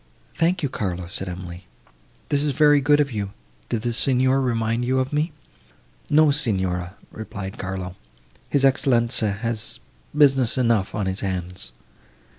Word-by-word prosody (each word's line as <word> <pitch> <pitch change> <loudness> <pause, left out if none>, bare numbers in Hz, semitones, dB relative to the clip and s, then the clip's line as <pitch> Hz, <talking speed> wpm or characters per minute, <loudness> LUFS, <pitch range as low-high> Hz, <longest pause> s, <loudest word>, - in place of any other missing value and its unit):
"Thank 175 +1 +1
you, - - +2
Carlo," 90 -6 -3
said 90 +2 -4
Emily, 90 0 -8 0.6
"this 145 -1 +2
is 145 -1 0
very 145 0 +5
good 145 +2 +4
of 145 -2 +1
you. 100 -3 -4 0.4
Did 115 -2 -2
the 120 -1 -1
Signor 130 +2 +2
remind 115 -2 0
you 130 +2 +1
of 130 +2 -1
me?" 150 +3 0 0.8
"No, 155 0 +5
Signora," 95 -7 0 0.2
replied 100 -3 -7
Carlo, 95 -1 -5 0.5
"his 140 -1 +2
Excellenza 120 -5 +3
has 115 +2 -2 0.4
business 135 -5 +4
enough 115 -6 +1
on 105 -2 -1
his 95 +1 -2
hands." 90 -7 -4
115 Hz, 145 wpm, -23 LUFS, 95-135 Hz, 0.8 s, very